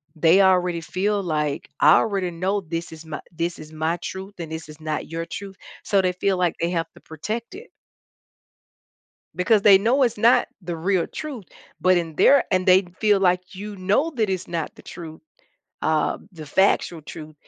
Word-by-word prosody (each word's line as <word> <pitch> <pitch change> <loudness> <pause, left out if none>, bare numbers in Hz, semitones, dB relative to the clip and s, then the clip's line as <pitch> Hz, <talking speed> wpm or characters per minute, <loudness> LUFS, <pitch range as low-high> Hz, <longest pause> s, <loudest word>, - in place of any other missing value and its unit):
they 165 +4 +5
already 180 -3 +3
feel 200 +5 -1
like, 150 -4 -2
"I 155 - +7
already 195 -5 0
know 190 +4 -1
this 165 0 -5
is 160 0 -11
my 155 -1 -6
this 170 +1 -3
is 155 0 -11
my 160 +2 -1
truth, 190 +3 -7
and 165 -2 -6
this 160 -1 -7
is 150 +1 -12
not 155 -1 -4
your 165 0 -4
truth," 195 +1 -8 0.3
so, 200 -2 +2
they 185 -1 +1
feel 190 +1 0
like 175 -2 +1
they 170 - 0
have 165 -2 -1
to - - -15
protect 220 - -6
it 450 +5 -11 1.7
because 200 +3 +3
they 200 -2 +8
know 245 +7 +3
it's 240 -4 0
not 230 +3 +4
the 175 -1 -4
real 180 +1 0
truth, 275 -10 -7 0.4
but 185 0 +4
in 165 -2 -3
their 280 - +5
and 185 0 +1
they 185 +1 +6 0.2
feel 210 -2 +3
like 180 0 +1
you 205 +2 -7
know 205 - +1
that 220 -4 0
it's 185 -1 -3
not 165 -2 -4
the - - -14
truth, 160 -3 -10 0.6
uh, 155 -1 +1 0.2
the 155 -4 -10
factual 175 -1 +1
truth, 155 +1 -10
180 Hz, 190 wpm, -23 LUFS, 165-200 Hz, 1.7 s, they